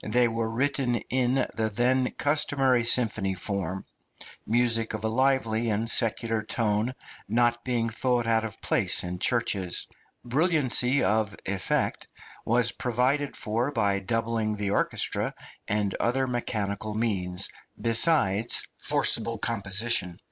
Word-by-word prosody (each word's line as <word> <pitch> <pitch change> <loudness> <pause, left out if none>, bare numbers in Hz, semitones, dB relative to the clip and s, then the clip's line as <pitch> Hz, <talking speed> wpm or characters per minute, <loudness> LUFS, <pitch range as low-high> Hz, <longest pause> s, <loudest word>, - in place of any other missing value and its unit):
They 120 +3 +3
were 115 -1 -2
written 130 +1 0 0.2
in 125 0 +2 0.2
the 110 -1 -1
then 125 +3 +2
customary 135 -4 +2
symphony 110 -5 +2
form; 95 -1 -3 0.6
music 115 -1 +1
of 110 - -7
a - - +1
lively 115 -2 +1
and 110 +2 -1
secular 115 -1 0
tone 110 +2 -1 0.3
not 120 +1 +2
being 120 -3 0
thought 120 +1 0
out 115 -1 +2
of 110 -2 -6
place - - 0
in 90 0 -5
churches. 100 -7 0 0.4
Brilliancy 140 -2 +2
of 110 -2 +1
effect 95 -1 -1 0.4
was 115 0 +3
provided 130 +4 0
for 115 +6 -1
by 100 -6 +1
doubling 110 +1 -1
the 100 -1 -2
orchestra - - 0 0.3
and 105 -2 0
other 130 +3 +1
mechanical 105 -4 -3
means, 95 -4 -1 0.3
besides 115 - +3 0.2
forcible 115 0 +2
composition. 100 -3 0
115 Hz, 120 wpm, -27 LUFS, 105-125 Hz, 0.6 s, They